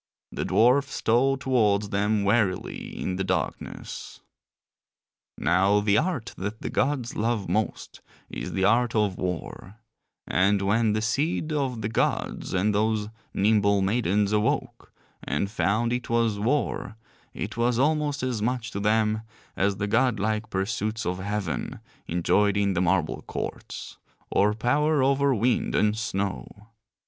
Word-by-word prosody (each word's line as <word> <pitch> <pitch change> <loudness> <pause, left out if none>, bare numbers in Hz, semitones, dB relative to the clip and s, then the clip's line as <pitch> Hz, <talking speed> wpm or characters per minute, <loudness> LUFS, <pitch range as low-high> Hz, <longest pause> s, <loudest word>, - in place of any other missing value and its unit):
The - - -3
dwarfs 135 +5 +3
stole 130 +4 +2
towards 105 -6 +1
them 105 +1 +1
warily 100 -3 0
in 90 - -2
the 95 - -1
darkness. 95 -3 -4 1.2
Now 100 +3 +3
the 105 0 +3
art 155 -9 -2
that 100 +3 -5
the - - -3
gods 135 -4 0
love 110 -2 -1
most 105 +5 -2 0.3
is - - -6
the 95 0 +1
art 115 +3 +3
of 105 -4 +1
war: 95 +2 -5 0.5
and 100 +3 +2
when 105 +2 +2
the 110 0 -1
seed 155 +6 0
of 130 -6 -1
the - - 0
gods 110 - -1
and 100 +3 +1
those 105 0 0 0.3
nimble 100 -1 +3
maidens 100 -1 +1
awoke 105 0 -1 0.3
and 100 +8 -2
found 110 +3 +1
it 125 0 -3
was 115 -3 +1
war 120 -1 -1 0.4
it - - -4
was 120 0 +1
almost 145 0 +1
as 125 -4 -1
much 120 +1 -1
to 100 - -4
them 110 +1 +2 0.3
as 100 +1 +1
the 105 - -1
godlike 110 -1 +1
pursuits 110 +3 -2
of 90 +1 -2
heaven, 95 -8 -3 0.3
enjoyed 100 +4 +2
in 100 -1 +2
the 90 - 0
marble 90 -3 +1
courts; - - -6 0.3
or 105 +2 +3
power 145 +5 +2
over 140 0 +3
wind 120 +3 +1
and 105 0 +3
snow. 100 0 -4
105 Hz, 140 wpm, -26 LUFS, 100-120 Hz, 1.2 s, dwarfs